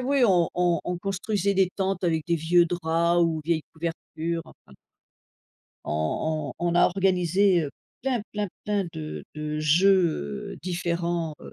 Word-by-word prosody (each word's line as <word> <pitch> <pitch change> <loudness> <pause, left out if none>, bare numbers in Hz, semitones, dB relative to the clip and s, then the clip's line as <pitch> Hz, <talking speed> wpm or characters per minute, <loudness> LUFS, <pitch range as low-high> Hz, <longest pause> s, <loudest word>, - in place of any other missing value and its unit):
ouais, 275 +2 +1
oui, - - +6
on 175 -5 +3
on 175 -2 +2
on 180 -1 -2
construisait 195 +1 -1
des 190 -1 +3
tentes 195 -1 -1
avec 160 -3 0
des 170 - +2
vieux 170 +2 +4
draps 170 0 +1
ou 160 -1 0
vieilles 165 -1 +1
couvertures, 165 0 -4
enfin 65 - -18 1.1
on 140 - -1
on 175 - -1
on - - -1
a 175 - +6
organisé, 185 0 +2
heu, 145 - -4 0.3
plein, 260 -2 0
plein, 210 -1 -2 0.2
plein 205 -2 0
de 155 -1 -6
de 150 0 -3
jeux, 160 - +2
heu, - - -12
différents, 170 -2 -2
heu, - - -11
170 Hz, 160 wpm, -26 LUFS, 160-190 Hz, 1.1 s, oui